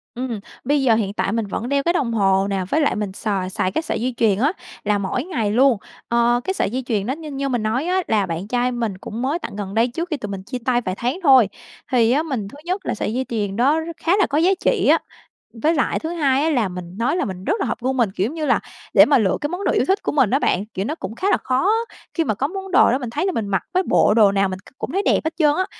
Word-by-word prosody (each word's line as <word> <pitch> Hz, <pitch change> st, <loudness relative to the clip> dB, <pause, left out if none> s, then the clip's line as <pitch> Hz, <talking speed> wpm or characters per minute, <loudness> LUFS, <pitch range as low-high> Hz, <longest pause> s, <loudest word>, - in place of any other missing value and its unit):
Ừm, 245 Hz, -3 st, -3 dB, 0.2 s
bây 285 Hz, +2 st, +2 dB
giờ 235 Hz, -4 st, +4 dB
hiện 205 Hz, -3 st, -1 dB
tại 200 Hz, -, -1 dB
mình 230 Hz, -1 st, -1 dB
vẫn 225 Hz, +5 st, -4 dB
đeo 280 Hz, 0 st, +1 dB
cái 340 Hz, +3 st, +2 dB
đồng 270 Hz, -9 st, 0 dB
hồ 195 Hz, -2 st, +2 dB
nè, 195 Hz, -1 st, -1 dB
với 310 Hz, -, +2 dB
lại 290 Hz, -, +2 dB
mình 210 Hz, -2 st, -3 dB
xài 195 Hz, -3 st, -2 dB
xài 185 Hz, 0 st, -1 dB
cái 320 Hz, -, -1 dB
sợi 315 Hz, -, -3 dB
dây 255 Hz, +1 st, -1 dB
chuyền 210 Hz, -4 st, +2 dB
á 285 Hz, +6 st, +3 dB, 0.3 s
là 210 Hz, 0 st, +1 dB
mỗi 200 Hz, +5 st, -2 dB
ngày 260 Hz, -, -2 dB
luôn. 255 Hz, +1 st, +4 dB, 0.3 s
Ờ, 235 Hz, +1 st, +3 dB
cái 380 Hz, -, -1 dB
sợi 380 Hz, -, 0 dB
dây 255 Hz, +4 st, -3 dB
chuyền 210 Hz, -5 st, -1 dB
đó 260 Hz, -, -1 dB
như 305 Hz, 0 st, -8 dB
như 275 Hz, 0 st, -2 dB
mình 245 Hz, -4 st, -1 dB
nói 245 Hz, +8 st, 0 dB
á 370 Hz, +1 st, +1 dB
là 210 Hz, -3 st, +2 dB
bạn 170 Hz, +2 st, -4 dB
trai 245 Hz, +2 st, 0 dB
mình 230 Hz, -6 st, -3 dB
cũng 215 Hz, +4 st, -6 dB
mới 280 Hz, +6 st, 0 dB
tặng 310 Hz, -, -7 dB
gần 200 Hz, -1 st, -5 dB
đây 230 Hz, +2 st, +3 dB
trước 335 Hz, +8 st, -4 dB
khi 305 Hz, -, -1 dB
tụi 210 Hz, -, -6 dB
mình 190 Hz, -1 st, -5 dB
chia 250 Hz, +5 st, -5 dB
tay 245 Hz, -1 st, +2 dB
vài 185 Hz, -4 st, -3 dB
tháng 250 Hz, +9 st, -2 dB
thôi. 260 Hz, -, +6 dB, 0.4 s
Thì 235 Hz, -2 st, +4 dB
á, 295 Hz, +4 st, +2 dB
mình 255 Hz, -10 st, -3 dB
thứ 245 Hz, -, -12 dB
nhất 370 Hz, +3 st, -2 dB
là -, -, -1 dB
sợi 215 Hz, -, -3 dB
dây 260 Hz, +2 st, -1 dB
chuyền 205 Hz, -4 st, -2 dB
đó 280 Hz, +7 st, +3 dB
r -, -, -6 dB
khá 335 Hz, +1 st, -1 dB
là 405 Hz, -, +3 dB
có 290 Hz, -, -1 dB
giá 345 Hz, +4 st, +4 dB
trị -, -, +2 dB
á, -, -, +5 dB, 0.5 s
với 300 Hz, +8 st, +1 dB
lại 295 Hz, -, +1 dB
thứ 320 Hz, -, -4 dB
hai 290 Hz, -5 st, +1 dB
á 325 Hz, -, +2 dB
là 240 Hz, -9 st, +1 dB
mình 180 Hz, 0 st, -8 dB
nói 235 Hz, +8 st, +1 dB
là 360 Hz, -, 0 dB
mình 185 Hz, -2 st, -6 dB
rất 330 Hz, -, +1 dB
là -, -, 0 dB
hợp -, -, -2 dB
gu 260 Hz, +1 st, 0 dB
mình. 235 Hz, -7 st, +1 dB
Kiểu 205 Hz, +6 st, -1 dB
như 315 Hz, -1 st, -3 dB
là, 270 Hz, -, +3 dB, 0.3 s
để -, -, +8 dB
mà 285 Hz, -, +4 dB
lựa 195 Hz, -5 st, +1 dB
cái 295 Hz, -, 0 dB
món 360 Hz, +3 st, -4 dB
đồ -, -, +2 dB
yêu -, -, +2 dB
thích 385 Hz, +2 st, +1 dB
của -, -, -1 dB
mình 265 Hz, -8 st, +3 dB
á 270 Hz, -, +2 dB
bạn, 195 Hz, -6 st, +1 dB
kiểu, 190 Hz, +2 st, -2 dB
nó 305 Hz, -, -2 dB
cũng 215 Hz, -, -7 dB
khá 380 Hz, +10 st, 0 dB
là -, -, +4 dB
khó 260 Hz, +9 st, +1 dB, 0.4 s
khi 330 Hz, -, +1 dB
mà 220 Hz, -, 0 dB
có 270 Hz, -, -1 dB
món 385 Hz, +3 st, -7 dB
đồ 370 Hz, -, +5 dB
đó 255 Hz, -, +2 dB
mình 245 Hz, -, -5 dB
thấy 295 Hz, +9 st, -2 dB
là 385 Hz, -, +1 dB
mình 225 Hz, -, -2 dB
mặc 195 Hz, -1 st, 0 dB
với 370 Hz, -, +2 dB
bộ 210 Hz, -, +3 dB
đồ 210 Hz, -3 st, +5 dB
nào 195 Hz, -1 st, +1 dB
mình 185 Hz, -, -5 dB
c 230 Hz, +7 st, -20 dB
cũng -, -, -5 dB
thấy 390 Hz, -, +1 dB
đẹp -, -, +3 dB
hết 320 Hz, -, -1 dB
trơn 300 Hz, -3 st, +3 dB
á. 375 Hz, -, +1 dB
245 Hz, 305 wpm, -21 LUFS, 210-300 Hz, 0.5 s, để